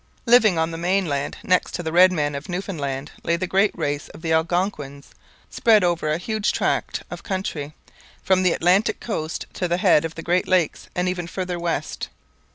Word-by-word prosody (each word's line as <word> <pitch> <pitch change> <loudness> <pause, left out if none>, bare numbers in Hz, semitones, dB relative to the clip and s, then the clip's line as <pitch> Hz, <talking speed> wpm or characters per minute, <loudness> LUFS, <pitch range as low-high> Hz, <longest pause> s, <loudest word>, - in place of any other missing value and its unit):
Living 230 -6 +5
on 160 0 0
the 165 - -6
mainland, 170 -6 0
next 185 0 +1
to 175 - -4
the 160 - -3
red 180 +2 +6
men 145 -4 -1
of 140 +6 -6
Newfoundland 150 -7 -4
lay 170 - +1
the 170 - -2
great 195 +3 +3
race 145 0 -2
of 160 - -13
the 160 -1 0
Algonquins, 160 -4 -1 0.4
spread 220 -4 +4
over 170 -3 0
a 155 - +1
huge 215 +4 -1
tract - - -1
of - - -6
country, 160 -7 -4 0.5
from 190 -1 +3
the 185 -2 +3
Atlantic 185 +5 +2
coast 160 -8 -4
to 180 - -2
the 175 0 0
head 180 -5 +4
of 165 0 -5
the 165 - -7
Great 180 +1 +1
Lakes, 180 -4 0
and 180 +1 0
even 180 -2 -2
farther 180 -1 -4
west. 170 -1 -3
175 Hz, 190 wpm, -23 LUFS, 160-185 Hz, 0.5 s, red